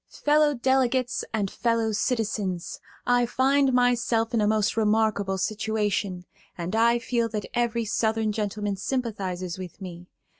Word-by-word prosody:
"Fellow 295 0 +2
Delegates 255 0 +1
and 205 -3 -1
Fellow 230 -2 0
Citizens: 210 -5 -2 0.3
I 245 0 +3
find 270 +2 +3
myself 240 -2 +2
in 230 - +2
a 210 - +2
most 215 -1 +1
remarkable 215 -3 +1
situation, 210 -3 -1 0.3
and 175 +4 -3
I 235 +1 +4
feel 235 -1 -1
that 210 -2 -4
every 235 -1 0
Southern 220 0 0
gentleman 205 -1 -2
sympathizes 190 -7 -3
with 180 -1 -8
me. 175 -2 -9
220 Hz, 135 wpm, -26 LUFS, 200-240 Hz, 0.3 s, I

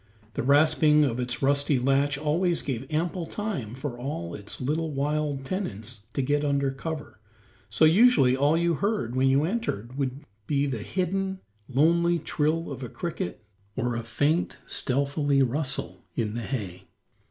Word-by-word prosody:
The - - -2
rasping 150 +2 +5
of 125 -4 0
its 125 +1 -2
rusty 140 +1 +3
latch 135 +2 +2
always 165 +4 +1
gave 135 +1 -4
ample 165 +2 -1
time 165 - -4
for 130 -2 -5
all 105 - -4
its 100 -1 -7
little 155 +5 -1
wild 145 -1 -1
tenants 120 - -4
to 135 - 0
get 145 +2 +1
under 140 -1 +1
cover, 150 -1 -6 0.5
so 160 - +4
usually 165 - +6
all 145 +4 +3
you 170 0 +2
heard 165 - -1
when 130 +1 +3
you 135 +2 +4
entered 145 - -3
would 135 0 -2 0.3
be 145 -1 +1
the 130 -5 -2
hidden, 190 - -2 0.3
lonely 170 +6 +3
trill 160 +1 -1
of 135 - -6
a 125 - -5
cricket 135 - -5 0.3
or 125 -2 -1
a 115 - -2
faint, 145 +9 0
stealthily 140 +1 +1
rustle 135 +2 -1
in 110 -3 -1
the 120 - -3
hay. 100 -8 -5
140 Hz, 155 wpm, -27 LUFS, 130-160 Hz, 0.5 s, usually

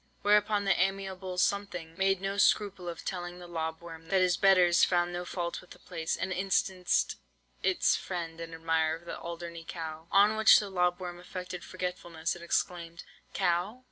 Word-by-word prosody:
Whereupon 205 0 +3
the 195 - +4
amiable 190 -1 -2
'something' 180 -4 -1
made 195 0 +1
no 195 +1 -2
scruple 195 -3 +2
of 170 - -8
telling 175 -1 -4
the 180 - -10
lob 160 -1 -4
worm 165 -1 -10
that 190 +3 +2
his 180 -1 +3
betters 180 -3 +5
found 175 -1 +2
no 175 0 -4
fault 175 -1 -4
with 180 - -19
the - - -12
place, 160 0 -3
and 185 0 -2
instanced 185 -1 +1 0.4
its 370 -2 +3
friend 165 -3 -5
and 165 0 -6
admirer 160 0 0
the - - -6
Alderney 170 0 -7
cow. 160 -1 -7
"On 205 +2 +5
which 220 0 +8
the 205 -2 -2
lob 180 -1 +1
worm 175 -1 -6
affected 180 0 -7
forgetfulness, 180 -3 -4
and 170 - -11
exclaimed, 170 -1 -2 0.3
'Cow? 185 +5 0
180 Hz, 175 wpm, -30 LUFS, 170-195 Hz, 0.4 s, which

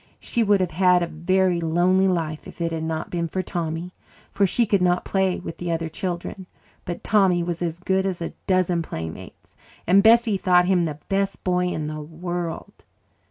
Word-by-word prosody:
She 235 - -1
would 205 -3 +3
have 180 -2 -1
had 180 +1 +4
a - - +1
very 175 +2 +1
lonely 175 +4 +3
life 160 -4 -2
if - - -12
it 170 -1 -1
had 165 -1 -3
not 160 0 -3
been 170 -1 -1
for 185 +3 -3
Tommy, 170 +1 -4 0.4
for 200 -1 +2
she 235 +6 +2
could 200 -3 +1
not 180 0 +2
play 190 -2 +1
with 170 - -8
the 175 -1 -3
other 165 0 -2
children. 180 +2 -5 0.4
But 175 - -5
Tommy 190 -5 +3
was 170 0 -4
as 170 -1 -2
good 190 +1 0
as 185 -2 -3
a 170 - -5
dozen 185 -2 +2
playmates, 80 - -8 0.3
and 190 +3 +5
Bessie 225 -1 +5
thought 180 -1 +4
him 180 -2 +2
the 150 -2 -4
best 195 0 -1
boy 180 -1 +1
in 155 -4 -3
the 155 0 -5
world. 170 +2 -6
180 Hz, 195 wpm, -23 LUFS, 165-190 Hz, 0.4 s, and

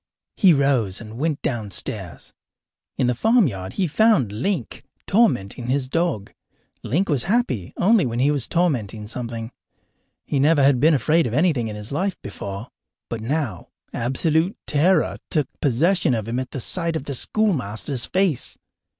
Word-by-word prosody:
He 190 -4 +5
rose 135 - +2
and 115 +1 -9
went 155 -1 -1
downstairs. 100 - -4 0.6
In - - +1
the 125 - +2
farmyard 125 - +1
he 190 - 0
found 170 - +3
Link 165 - -3 0.2
tormenting 125 - +1
his 130 0 0
dog. 165 - -1 0.5
Link 175 - 0
was 145 -7 0
happy 190 - 0
only 200 - +4
when 115 0 -3
he 135 +4 +3
was 140 -5 0
tormenting 120 - -1
something. 115 0 -5 0.7
He 140 - -1
never 145 +1 +4
had 135 -2 +4
been 155 +3 +5
afraid 155 +2 +2
of 115 - -3
anything 150 -7 +2
in 105 - -5
his 105 +3 -8
life 185 +6 -1
before, 100 +2 -7 0.4
but 115 -2 -3
now 120 - -2 0.3
absolute 160 - 0
terror 160 +3 +2
took 150 -5 0
possession 150 +2 +2
of 110 -1 -3
him 120 +2 -1
at 130 +2 -5
sight 170 +6 0
of 160 - -2
the 140 - -5
schoolmaster's 135 - 0
face. 185 -8 0
135 Hz, 150 wpm, -22 LUFS, 115-165 Hz, 0.7 s, He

